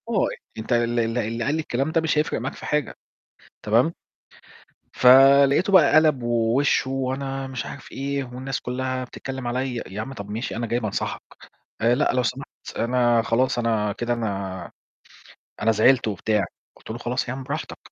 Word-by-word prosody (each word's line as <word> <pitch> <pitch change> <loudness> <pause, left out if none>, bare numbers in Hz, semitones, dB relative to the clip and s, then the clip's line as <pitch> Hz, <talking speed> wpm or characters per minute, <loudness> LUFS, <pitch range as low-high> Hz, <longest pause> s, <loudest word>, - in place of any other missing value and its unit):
آه، 215 -5 +2 0.3
أنت 110 +3 -2
ال 120 0 +1
ال 115 +1 0
اللي 115 0 -2
قال 145 +5 0
لي - - -1
الكلام 135 +1 -2
ده 165 - +2
مش 160 -1 0
هيفرق 150 - 0
معاك - - -4
في - - -10
حاجة، 150 -3 -1 0.7
تمام. 115 +10 +3 1.0
فلقيته 140 +7 +6
بقى 165 -7 +6
قلَب 155 -4 +4
ووشّه، 120 +3 +1
"وأنا" 135 +1 -3
مش 130 -1 -5
عارف 140 - -10
إيه، 140 0 -2
"والناس 130 +1 -5
كلّها 130 +1 -3
بتتكلم 130 0 -7
عليَّ." 125 +1 -2
يا 100 +3 -6
عمّي 135 +5 -6
طب 100 -4 -8
ماشي 110 +3 -4
أنا 120 +1 -2
جاي 120 +2 -1
بانصحك. 110 -4 -3 0.6
آآ، 115 +2 +4
"لأ، 145 - +1
لو 125 - +1
سمحت 130 +4 -3 0.3
أنا 120 -1 +2
خلاص 120 +3 +1
أنا 110 -3 0
كده 120 +3 -2
أنا 100 -6 -4 0.9
أنا 110 +1 +3
زعلت" 120 +3 +4
وبتاع، 105 +1 0 0.3
قُلت - - -16
له: 110 - -4
"خلاص 120 +2 -2
يا - - -2
عم 135 0 -6
براحتك." - - -5
125 Hz, 175 wpm, -23 LUFS, 115-135 Hz, 1.0 s, فلقيته